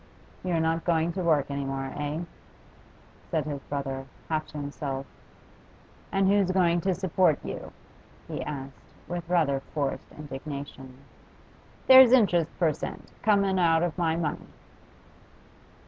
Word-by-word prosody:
'You're 175 -3 0
not 160 0 0
going 170 -1 +1
to 185 - -3
work 155 -5 +2
any 140 0 -2
more, 135 0 -4
eh?' 150 +3 -3 1.1
said - - 0
his 145 -2 -4
brother, 135 -2 -4 0.2
half 155 -1 -1
to 150 - -9
himself. 140 -1 -4 1.1
'And 195 0 +2
who's 200 -1 +3
going 175 -2 +3
to 190 0 +1
support 180 -3 +2
you?' - - -6 0.6
he - - -4
asked, 135 -2 -8
with 175 -1 -5
rather 155 -6 +2
forced 140 0 -4
indignation. 140 -2 -8 0.9
'There's 260 -1 +9
interest 180 -10 +4
per 160 -3 +2
cent. - - -7
coming 200 -3 +3
out 165 -1 +4
of 175 -2 -1
my 165 -3 +1
money. 165 -3 -3
160 Hz, 130 wpm, -27 LUFS, 140-180 Hz, 1.1 s, There's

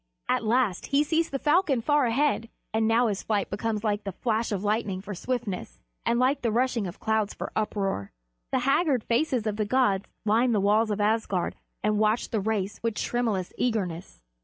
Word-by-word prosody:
At - - +1
last 225 -4 +1
he 280 +1 +3
sees 325 +2 +1
the 275 - -2
falcon 295 -2 +2
far 290 +2 +2
ahead, 235 -2 +1 0.2
and 220 0 +2
now 230 +2 +4
his 205 -4 -1
flight 205 -3 -1
becomes 215 +1 -2
like 205 -1 0
the 195 - -4
flash 225 +4 -1
of 200 -3 -1
the - - -5
lightning 205 -3 0
for 205 +2 -7
swiftness, 200 - -4 0.3
and 235 - +3
like 265 +3 +2
the 230 - 0
rushing 240 -3 +1
of 175 - -8
clouds 220 -2 0
for - - -5
uproar. 195 - -1 0.4
The 260 - +1
haggard 275 -3 +2
faces 240 -1 +1
of 210 -1 -1
the 215 - 0
gods 205 -4 +2 0.2
line 230 +3 +3
the 210 - +3
walls 210 +3 +3
of 210 0 -1
Asgard 210 -4 0 0.3
and 210 0 +2
watch 215 +2 +1
the 225 - +1
race 205 -1 -2
with 230 -2 -1
tremulous 220 -8 -1
eagerness. 180 - -2
220 Hz, 195 wpm, -27 LUFS, 205-245 Hz, 0.4 s, now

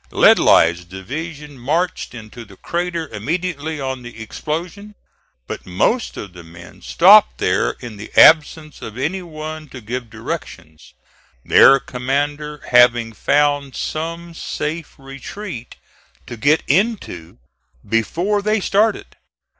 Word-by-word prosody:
Ledlie's 85 +2 +4
division 140 - -8
marched 160 +2 -2
into 115 +1 -10
the 100 -3 -16
crater 170 -2 -3
immediately 155 - -3
on 130 -2 -4
the 120 -2 -11
explosion, 175 - -6 0.5
but - - -8
most 100 - 0
of 100 -3 -8
the 90 -1 -12
men 85 0 -14
stopped 200 +5 +6
there 95 +3 0
in 120 -4 -8
the 105 - -10
absence 155 0 +5
of 110 +1 -8
any 170 +9 -2
one 155 -2 -8
to 130 - -9
give 120 +1 -6
directions; 110 - -8 0.5
their 135 - +7
commander 145 +4 -3
having 120 -2 +4
found 145 +2 +1
some 165 +2 -5
safe 160 0 -5
retreat 135 - -9 0.5
to 120 - -8
get 145 +7 +2
into 165 - -1 0.5
before 175 - 0
they 215 +2 +1
started. 210 +3 +1
145 Hz, 120 wpm, -19 LUFS, 115-165 Hz, 0.5 s, their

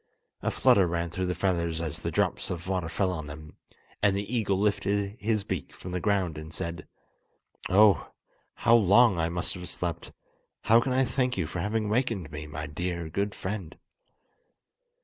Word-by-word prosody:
A - - 0
flutter 95 -3 +4
ran 85 0 -2
through 95 +2 -2
the 90 - -1
feathers 85 -3 0
as 80 -3 -4
the - - -2
drops - - 0
of 85 0 -5
water 90 -3 -1
fell 95 +2 0
on 80 -4 -5
them, 75 +1 -10 0.4
and 100 -2 +3
the 100 +5 -3
eagle 100 -4 +1
lifted 100 0 0
his 110 -1 0
beak 95 -6 -5
from 90 - -8
the 90 - -1
ground 95 -6 0
and 80 +1 -9
said: 85 0 -5 0.8
"Oh, 100 0 +5 0.5
how 115 - +3
long 110 -1 +5
I 80 0 +1
must 85 0 -2
have 90 0 -7
slept! 85 -2 -4 0.5
How 115 +2 +5
can 130 - -1
I 130 +1 +3
thank 125 -1 0
you 90 - 0
for 80 +3 -5
having 105 +4 -1
awakened 105 - -1
me, 75 0 -6
my 75 - -5
dear, 85 +1 -4
good 100 +5 -2
friend!" 95 -4 -5
95 Hz, 180 wpm, -28 LUFS, 85-105 Hz, 0.8 s, Oh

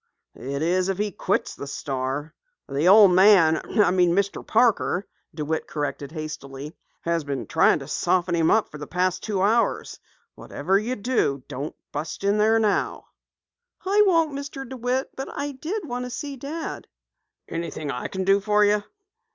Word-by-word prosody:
"It 140 +4 -4
is 180 +3 +1
if 190 - -1
he 210 0 -1
quits - - -1
the 140 - -8
Star. 140 +2 -4 0.3
The 145 +5 0
old 200 0 +8
man 180 -4 +6
Mr. 190 0 +1
Parker 220 -4 +2
" - - -32
DeWitt 155 0 -2
corrected 145 -1 -4
hastily, 150 -2 -7 0.3
"has 170 -1 -1
been 140 -3 -4
trying 160 - +3
to 135 -3 -9
soften 175 +3 0
him 165 -1 +2
up 220 - +2
for 150 - -9
the 150 - -7
past 185 +1 0
two 200 -3 -1
hours. 225 +3 +1 0.3
Whatever 195 +1 -1
you 240 +4 -2
do, 200 - 0
don't 145 +4 -5 0.2
bust 155 +6 -5
in 200 +1 +2
there 220 +1 +4
now." 215 -2 0 0.8
"I 405 +2 +4
won't, 330 -5 +3
Mr. 280 -1 -6
DeWitt, 255 +1 -2
but 270 - -5
I 285 0 -2
did 325 +8 -5
wish 245 -1 -3
to - - -6
see 285 +2 -5
Dad." 295 +5 -6 0.6
"Anything 160 -3 -4
I 125 - -4
can 190 0 -3
do 195 +1 +4
for 210 +1 +3
you?" 205 0 +3
190 Hz, 165 wpm, -24 LUFS, 155-235 Hz, 0.8 s, old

